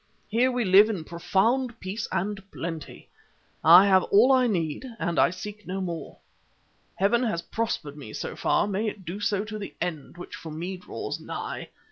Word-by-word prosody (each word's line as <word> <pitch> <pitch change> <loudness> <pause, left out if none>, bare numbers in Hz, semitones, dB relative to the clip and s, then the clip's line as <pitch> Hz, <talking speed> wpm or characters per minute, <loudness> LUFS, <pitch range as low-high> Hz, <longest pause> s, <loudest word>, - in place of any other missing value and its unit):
Here 245 +4 +3
we 245 -2 0
live 200 +3 +7
in 195 -7 -3
profound 230 +9 0
peace 200 +4 -4
and 195 +2 -2
plenty. 165 -2 -6 0.6
I 175 +5 +9
have 190 -2 +5
all 230 +7 +5
I 255 -1 +5
need, 165 - -1
and 170 -5 -1
I - - +5
seek 205 +3 -8
no 190 +1 -3
more. 170 -3 -5 0.8
Heaven 205 +5 +2
has 215 -9 -1
prospered 220 -10 -3
me 135 -8 -9
so - - -5
far—may 205 +2 +1
it 205 -3 -6
do 175 +4 -5
so 205 0 0
to 215 0 -6
the 200 - -7
end, 170 -2 -4
which 175 - -8
for 165 - -9
me 170 +5 -4
draws 180 - -6
nigh. - - -6
195 Hz, 175 wpm, -26 LUFS, 170-215 Hz, 0.8 s, I